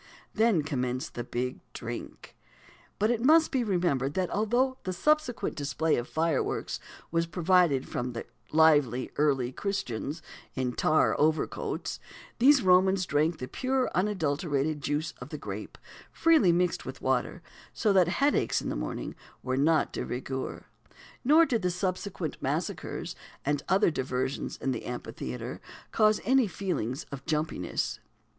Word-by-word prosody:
Then 220 -7 +3
commenced 130 -1 -2
the 120 - -4
"big 125 +2 -3
drink." - - -7 0.6
But 215 +3 +2
it 235 -1 -1
must 315 +4 +5
be 260 -2 +1
remembered 175 - 0
that 185 -2 0
although 245 +5 +1
the 185 - -3
subsequent 300 - +1
display 145 +2 0
of 120 - -3
fireworks 160 -2 -1 0.3
was 165 0 +1
provided 170 -5 +3
from 125 0 -3 0.4
lively 145 -6 +4
Early 135 -4 +2
Christians, 155 - -3 0.3
in 125 -2 -1
tar 155 +4 +3
overcoats, 155 +1 0 0.4
these 270 +1 +6
Romans 185 0 +4
drank 155 +1 +1
the 125 - -5
pure, 260 - 0
unadulterated 155 -6 0
juice 150 +4 -1
of - - -7
the - - -5
grape, - - -7 0.3
freely 320 - +4
mixed 175 +1 +1
with - - -7
water; - - 0 0.3
so 215 -4 +1
that 185 -3 +5
headaches 280 +11 +2
i' - - -8
th' - - -2
morn - - -4 0.3
were 130 0 -1
not 155 +4 +2
de - - -2
rigueur, 130 +1 -4 0.6
nor 310 +6 +6
did 235 -7 0
the 180 - +1
subsequent 185 -2 -3
massacres - - -3 0.3
and 145 0 +1
other 190 -1 +4
diversions 130 -1 -2
in 135 - -1
the 125 - -4
Amphitheatre 65 - -6 0.3
cause 215 -1 +4
any 260 0 +4
feelings 160 - -3
of 140 -1 -7
"jumpiness." 155 - -1
165 Hz, 140 wpm, -29 LUFS, 135-200 Hz, 0.6 s, these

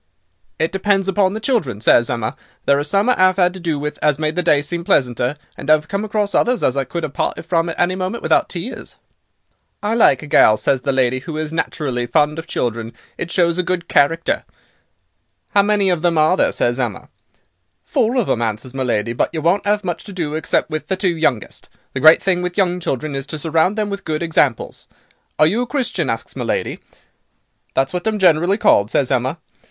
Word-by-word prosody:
"'It 160 +1 0
depends 195 0 +1
upon 195 0 +1
the - - -3
children,' 200 - -1
says 120 +1 +4
Emma; 115 -2 -2 0.3
'there 140 0 +3
are - - -1
some 195 +9 +1
I 250 - +5
'ave 185 +1 +4
'ad 180 0 +3
to 190 - -9
do 165 -4 -2
with 150 +1 -5
as 150 -2 +2
made 155 0 -2
the 180 - +1
day 150 -4 +2
seem 170 +4 -4
pleasanter, 125 -2 +1 0.2
and 140 - -7
I've 155 0 +4
come 200 +3 -3
across 210 -2 -1
others 245 +5 +1
as 130 - +2
I 135 -1 -1
could 170 +5 -4
'ave 150 - -7
parted - - -3
from 170 -1 0
at 165 - -6
any 175 +1 +2
moment 185 +5 -4
without - - +2
tears.' - - -7 0.9
"'I 210 +2 0
like 185 - +4
a - - -7
gal,' 110 -6 +5
says 130 +4 0
the 140 - -1
lady, 130 -1 +1
'who 155 +4 -7
is 155 0 -3
naturally 130 -7 -2
fond 150 +2 +1
of 160 - -8
children, 115 -1 -3 0.2
it 170 - -5
shows 170 -1 +2
a - - +4
good 180 -1 -3
character.' 165 +4 +1 1.1
"'How 200 - +4
many 200 -2 +2
of 175 -3 -1
them 170 -2 +1
are 155 +4 +4
there?' - - +2
says 120 +2 0
Emma. 120 -6 -3 0.7
"'Four 230 +3 0
of 240 - +2
them,' 120 - -1
answers 115 +3 -3
my 135 - -4
lady, 115 -2 -1
'but - - 0
you 160 - -3
won't 190 +4 +1
'ave 210 0 +2
much 175 -3 -4
to 205 - -9
do 165 -5 -3
except 160 +1 -1
with 155 -1 -4
the 190 - -1
two 185 -2 0
youngest. 140 -9 -2 0.2
The - - -3
great 155 +3 +7
thing 180 -2 +1
with 180 +1 -4
young 180 -2 +1
children 150 -3 -3
is 135 0 -4
to 155 - -5
surround 165 +6 +1
them 210 -1 -1
with 200 0 -5
good 155 0 -2
examples. 150 -7 0 0.5
Are 155 - +5
you 205 +10 +1
a 245 - -2
Christian?' 245 - -1
asks 115 0 -4
my - - -4
lady. - - -2 1.0
"'That's 135 +3 0
what 180 +4 -3
I'm 215 -1 0
generally 180 +1 +3
called,' 100 - +3
says 135 +1 +1
Emma. 130 +4 0
165 Hz, 220 wpm, -19 LUFS, 135-185 Hz, 1.1 s, great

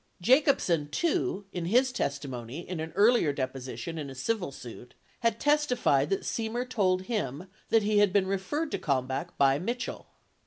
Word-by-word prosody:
33 235 +9 +6
Jacobsen, 180 - +1
too, 205 - -1
in 175 -2 -3
his 250 +8 +3
testimony 140 - -4
in 180 -2 -4
an 160 +1 -4
earlier 215 -7 +4
deposition 130 +2 -5
in 145 -2 -5
a 135 - -9
civil 180 - -2
suit, 125 -1 -11 0.2
had 230 -1 +1
testified 250 - +2
that 195 - 0
Semer 235 +2 -2
told 185 -6 +1
him 185 - -3 0.2
that 225 -2 +4
he 210 0 +3
had 205 -2 +4
been 195 0 +3
referred 245 +12 -2
to - - -2
Kalmbach 130 -2 -2
by 135 0 +4
Mitchell. 240 +8 -4
185 Hz, 165 wpm, -29 LUFS, 140-230 Hz, 0.2 s, 33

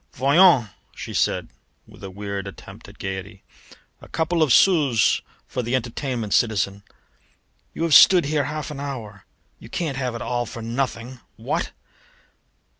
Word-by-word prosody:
"Voyons," 140 - +5 0.3
she - - -7
said - - 0 0.4
with - - -17
a 95 - -6
weird 100 0 -5
attempt 100 - -12
at - - -16
gaiety, 95 +1 -6 0.6
"a - - -13
couple 165 +1 -1
of 155 -4 +3
sous 145 - +4 0.2
for 125 - -4
the 120 +2 -1
entertainment, 120 -2 -3
citizen! 100 -3 +1 0.9
You - - -3
have 165 -2 +1
stood 180 +1 +8
here 145 -1 0
half 155 0 -5
an 145 - -7
hour. 115 -8 -7 0.3
You - - -13
can't 155 -6 -3
have 125 -3 -2
it 115 - -6
all 120 0 -2
for 115 - -8
nothing, 125 +1 -3 0.2
what?" - - -3
125 Hz, 150 wpm, -23 LUFS, 105-145 Hz, 0.9 s, stood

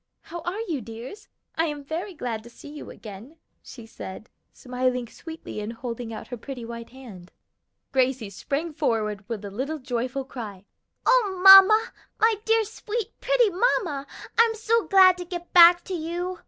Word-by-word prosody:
"How 340 +1 -8
are 355 +6 -4
you, 330 - -3
dears? 230 - -10 0.3
I 325 - 0
am 295 -2 -5
very 340 +7 -5
glad 235 -6 -4
to 235 - -13
see 240 - -13
you 300 0 -9
again," 220 +9 -11 0.2
she 235 -4 -12
said, 215 -1 -10 0.2
smiling 250 -1 -2
sweetly 325 -3 -9
and 210 +1 -4
holding 235 -1 -6
out 220 - -8
her 245 - -6
pretty 245 0 -8
white 230 0 -8
hand. 225 -9 -13 0.6
Gracie 255 -5 0
sprang 295 - -4
forward 215 -8 -1
with 215 -3 -5
a 200 - -7
little 270 +9 -3
joyful 255 0 -3
cry. 210 -7 -8 0.4
"O 415 -7 +3
mamma, 395 +4 +9 0.3
my 445 +1 +4
dear, 450 0 +3
sweet, 440 0 -5
pretty - - +3
mamma! 350 - 0 0.3
I - - +10
am 450 - -4
so 450 0 0
glad 375 -2 +6
to - - -4
get 350 -1 -8
back 345 0 +8
to 380 - -6
you!" 350 +2 -4
290 Hz, 170 wpm, -25 LUFS, 235-370 Hz, 0.6 s, I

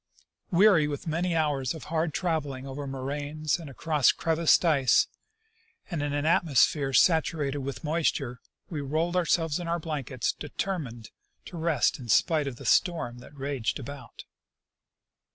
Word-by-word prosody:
Weary 180 -4 +5
with 145 -1 -5
many 170 +2 -1
hours 145 -3 0
of 160 - -9
hard 160 0 -1
trav 165 -1 0
eling 135 -2 -7
over 140 +1 -6
moraines 145 +4 -3
and 160 -4 -9
across 150 0 +2
crevassed 165 +1 +2
ice, 140 -6 +4 0.9
and 165 -4 -2
in 145 0 -2
an 145 +1 -1
atmos 160 -4 +4
phere 140 -3 -3
saturated 150 -2 +2
with 135 -1 -5
moisture, 150 -5 -1 0.3
we 155 -4 -4
rolled 160 +5 -1
ourselves 165 -2 +1
in 175 - -5
our 170 +1 0
blankets, 145 -7 -2
determined 145 - -5 0.3
to - - -10
rest 160 -6 +1
in 120 -3 -9
spite 150 +7 +3
of 135 - -4
the - - -11
storm 140 -10 +1
that 140 +4 -14
raged 135 -4 -2
about. 140 +1 -9
150 Hz, 150 wpm, -27 LUFS, 135-165 Hz, 0.9 s, Weary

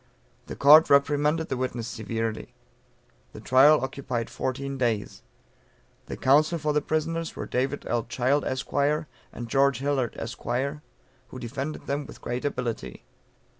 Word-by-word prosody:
The - - -6
Court 150 +3 +7
reprimanded 150 +3 +2
the 130 - -2
witness 125 -3 -3
severely. 115 -1 -4 0.8
The - - -9
trial 135 +3 +5
occupied 130 -3 -4
fourteen 135 +1 -3
days. 115 -5 -1 0.9
The - - -6
counsel 150 +5 +3
for 150 -1 -1
the 150 - +2
prisoners 165 +2 -2
were - - -5
David 130 +2 -2
L. 120 -2 -1
Child, 130 +4 +1
Esq., 130 0 -4
and 145 -4 -2
George 135 +1 +3
Hillard, 135 -2 -1
Esq., 115 0 -6 0.9
who - - -10
defended 135 +5 -5
them 140 0 -3
with - - -12
great 120 +3 -4
ability. 120 - -4
135 Hz, 135 wpm, -26 LUFS, 120-145 Hz, 0.9 s, Court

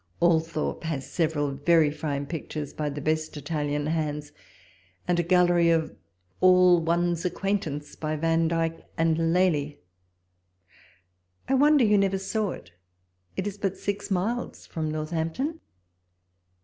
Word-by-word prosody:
Althorpe 165 -2 +1
has 140 -5 -3
several 150 -2 0
verj' 150 +1 +3
fine 145 -2 -3
pictures 150 -1 -5
by 150 -1 -2
the 145 +1 -5
best 155 +1 -1
Italian 145 0 -2
hands, 150 -2 -2 0.8
and 175 -1 +2
a - - +5
gallery 175 -1 +4
of 165 -1 +1 0.4
all 180 -1 +6
one's 170 +1 0
acquaintance 180 -6 -2
by 155 0 -3
Vandyke 165 +1 0
and 165 0 +2
Lely. 160 -5 +1 1.7
I 270 - +1
wonder 285 -1 +5
you 210 -1 +4
never 195 -1 +1
saw 200 +2 -1
it; 85 - -9 0.7
it 190 - -1
is 205 0 -5
but 195 -2 -2
six 200 +1 -3
miles 210 +6 -2
from 160 -1 -3
Northampton. 160 - -2
165 Hz, 125 wpm, -26 LUFS, 155-180 Hz, 1.7 s, all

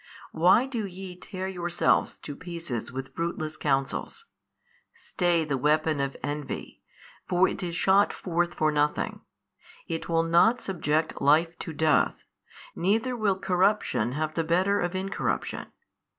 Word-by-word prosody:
Why 180 +9 +4
do 235 -6 -3
ye 185 0 -8
tear 185 +1 -6
yourselves 175 -2 +1
to 145 - -6
pieces 165 -9 -5
with 135 +1 -6
fruitless 160 -2 -3
counsels? 140 - -2 0.7
stay 175 -3 0
the 140 -3 -1
weapon 155 +1 +2
of 140 0 -2
envy, 145 -1 -5 0.5
for 180 +1 +4
it - - -4
is 175 -2 -3
shot 195 +4 +4
forth 175 -1 -1
for 155 0 +2
nothing: 150 0 0 0.6
it 165 +1 -4
will 165 0 +3
not 170 +9 +4
subject 160 -6 -1
Life 160 +4 +4
to 165 - -5
death, 155 -1 +2 0.5
neither 220 +8 +1
will 205 -5 +1
corruption 190 - +1
have 155 +2 -2
the 165 - 0
better 185 +5 +2
of 175 +1 -2
incorruption. 195 +1 -2
170 Hz, 135 wpm, -27 LUFS, 155-190 Hz, 0.7 s, Why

